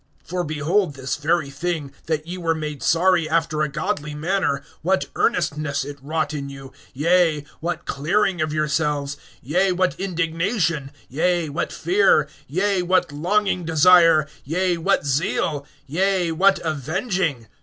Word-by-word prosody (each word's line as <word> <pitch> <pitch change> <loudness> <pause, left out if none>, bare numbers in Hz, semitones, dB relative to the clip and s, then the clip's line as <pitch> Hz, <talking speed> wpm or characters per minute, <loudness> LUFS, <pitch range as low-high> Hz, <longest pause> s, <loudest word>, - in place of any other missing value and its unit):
(11)For 180 -1 -2
behold 155 +2 0
this 135 0 -3
very 155 -1 0
thing, 150 -1 -3 0.2
that 155 -1 -1
ye 175 +2 -5
were 165 -3 0
made 150 -3 -5
sorry 170 -1 +3
after 160 -1 0
a 150 - +1
godly 150 -1 -3
manner, 160 -3 0 0.2
what 185 +3 +1
earnestness 155 -8 0
it 145 0 -8
wrought 155 +1 -2
in 140 -2 -4
you; 135 -1 -10 0.2
yea, 160 0 +2
what 170 0 -3
clearing 180 +5 0
of 155 -1 0
yourselves; 150 -2 0 0.3
yea, 180 +9 +2
what 180 -1 +1
indignation; 165 - -1 0.2
yea, 170 +3 0
what 145 - -3
fear; 175 -4 +3 0.2
yea, 190 +5 +1
what 180 -2 +1
longing 185 +5 0
desire; 165 -1 +5 0.2
yea, 180 +5 0
what 170 0 +1
zeal; 145 +1 -1 0.2
yea, 180 +3 +1
what 195 +4 +4
avenging! 160 - -1
165 Hz, 140 wpm, -22 LUFS, 150-180 Hz, 0.3 s, desire